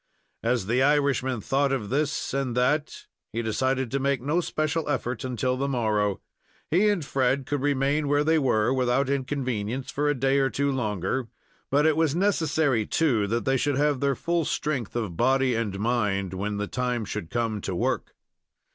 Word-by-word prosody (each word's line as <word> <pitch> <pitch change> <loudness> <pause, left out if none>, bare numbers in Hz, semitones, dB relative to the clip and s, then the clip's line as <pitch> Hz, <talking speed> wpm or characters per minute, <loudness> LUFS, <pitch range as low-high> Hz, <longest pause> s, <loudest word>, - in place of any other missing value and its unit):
As 115 -3 0
the 120 +5 +1
Irishman 135 -4 +2
thought 135 +5 +1
of 120 -6 -2
this 150 +2 -1
and 135 -3 -1
that, 145 +5 0 0.3
he 115 +1 -2
decided 130 +3 0
to 140 - 0
make 140 -1 +1
no 150 +8 0
special 155 -1 -2
effort 125 -4 -2
until 125 0 -1
the 140 +2 -1
morrow. 105 -6 0 0.5
He 195 +6 +4
and 190 -8 0
Fred 135 0 +1
could 145 0 -2
remain 145 +1 +1
where 145 +1 +2
they 160 +1 +3
were 125 -3 +2
without 130 +1 +1
inconvenience 130 -3 -2
for 145 +1 0
a 145 - +1
day 135 +1 +2
or 135 -1 +2
two 140 +2 0
longer, 110 -1 -2 0.4
but 145 +2 +3
it 160 -1 +4
was 160 -2 +1
necessary, 160 - +1
too, 120 -11 +2
that 115 +3 -1
they 135 0 +2
should 145 +1 0
have 145 -2 +2
their 140 0 +1
full 170 +3 0
strength 135 -8 -2
of 110 -8 -2
body 130 +1 +3
and 110 -4 -2
mind 105 -5 0
when 100 +2 -3
the 105 - -1
time 125 0 -2
should 100 -5 -5
come 115 -3 -1
to 95 - -3
work. - - -1
130 Hz, 180 wpm, -26 LUFS, 115-145 Hz, 0.5 s, He